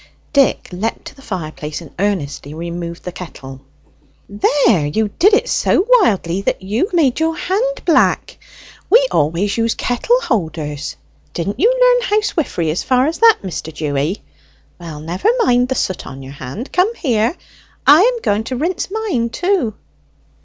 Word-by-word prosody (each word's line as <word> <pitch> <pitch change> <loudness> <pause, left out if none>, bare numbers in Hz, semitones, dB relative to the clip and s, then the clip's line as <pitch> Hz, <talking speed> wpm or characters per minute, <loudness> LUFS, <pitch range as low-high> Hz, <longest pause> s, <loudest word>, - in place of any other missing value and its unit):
Dick 280 -2 +2
leapt 195 +6 -3
to - - -10
the 270 - -16
fireplace, 155 - -5
and 165 -5 -12
earnestly 155 -7 -2
removed 170 +1 -6
the 180 - -5
kettle. 135 -7 -10 0.7
"There! 205 - +2
you 210 +8 0
did 405 +4 +6
it 475 +3 0
so 385 - +2
wildly 200 - +3
that 195 - -2
you 210 - 0
have 410 - -14
made 285 -6 +2
your 320 0 0
hand 485 +8 -1
black. 335 - +2 0.5
We - - +5
always 170 +7 +1
use 230 0 +1
kettle 360 - +1
holders; 155 - -3 0.4
didn't 200 +7 -3
you 445 - +5
learn - - +3
housewifery 325 - 0
as 165 - -2
far 255 0 +2
as 320 +3 -2
that, 455 -1 +5
Mr. 170 -3 -5
Dewy? 150 +4 -2 0.6
Well, 160 -4 -8
never 175 - -1
mind 250 - +2
the 260 - 0
soot 185 -6 -2
on 135 +1 -9
your 135 +1 -9
hand. 140 - -8
Come 385 +6 +2
here. 240 - 0 0.5
I 300 +4 +8
am 480 +2 +2
going 205 +2 +1
to 255 - -3
rinse 335 +8 -2
mine, 385 - -1
too." 350 - 0
225 Hz, 160 wpm, -17 LUFS, -, 0.7 s, I